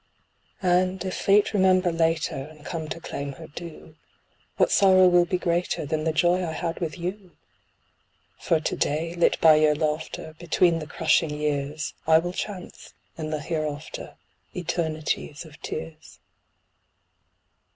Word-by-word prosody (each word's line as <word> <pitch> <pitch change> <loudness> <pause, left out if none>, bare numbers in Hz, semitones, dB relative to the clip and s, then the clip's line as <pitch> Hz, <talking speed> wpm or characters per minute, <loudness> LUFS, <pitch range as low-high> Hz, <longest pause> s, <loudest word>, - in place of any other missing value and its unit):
And 185 +1 +2
if 185 - -2
Fate 205 +2 +3
remember 185 -2 +4
later, 165 -1 +1
and 150 +2 -9
come 160 -2 -4
to 165 - -5
claim 140 -3 -5
her - - -11
due, 160 0 -10 0.6
What - - +3
sorrow 185 -2 +6
will 175 -1 +5
be 180 +1 -1
greater 175 -2 -1
than 155 +1 -2
the 160 - +2
Joy 175 +3 +2
I 165 -2 -3
had 165 +1 -3
with 165 0 -3
you? 180 0 -6 1.0
For 165 - +1
to 155 - -2
day, 160 +3 -1
lit 175 0 +2
by 155 -1 +7
your 155 -1 +4
laughter, 155 +1 -3
between 170 0 +2
the 155 - -7
crushing 160 0 +2
years, 150 0 -2
I 160 0 +7
will 175 +2 -1
chance, 185 -1 -7 0.2
in 155 -1 -5
the 155 -1 -2
hereafter, 155 -2 -4 0.4
eternities 160 -3 -2
of 155 0 -15
tears. 155 0 -7
165 Hz, 145 wpm, -25 LUFS, 155-175 Hz, 1.0 s, by